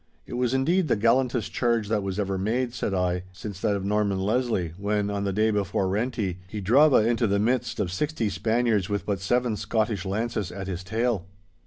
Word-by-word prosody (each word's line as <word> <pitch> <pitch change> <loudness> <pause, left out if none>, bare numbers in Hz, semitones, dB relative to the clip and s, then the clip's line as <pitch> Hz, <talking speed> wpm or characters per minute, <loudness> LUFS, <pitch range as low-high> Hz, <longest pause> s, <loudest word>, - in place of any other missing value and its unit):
'It - - -9
was 125 -1 0
indeed 165 +7 +2
the - - +3
gallantest 120 +1 +1
charge 115 -3 +1
that 110 +1 +1
ever 95 0 -2
was 95 0 -2
made,' 120 +3 0
said 115 -4 -2
I, 90 -1 0
'since 95 +1 -8
that 105 - +1
of 100 -1 -3
Norman 105 -1 +1
Leslie, 100 -4 0
when, 105 0 0
on 100 0 -2
the 100 - 0
day 110 +3 +2
before 100 -2 0
Renti, 100 -2 -1
he 105 +2 -5
drava 125 +4 +5
into 115 0 +2
the 100 0 +2
midst 120 +2 0
of 95 -4 -1
sixty 145 +3 -1
Spaniards 110 +1 +1
with 100 0 -2
but 100 -2 -2
seven 120 +3 +1
Scottish 110 -1 -1
lances 105 0 -2
at 95 0 -6
his 90 -1 -4
tail. 110 -2 -1
105 Hz, 200 wpm, -26 LUFS, 95-120 Hz, -, drava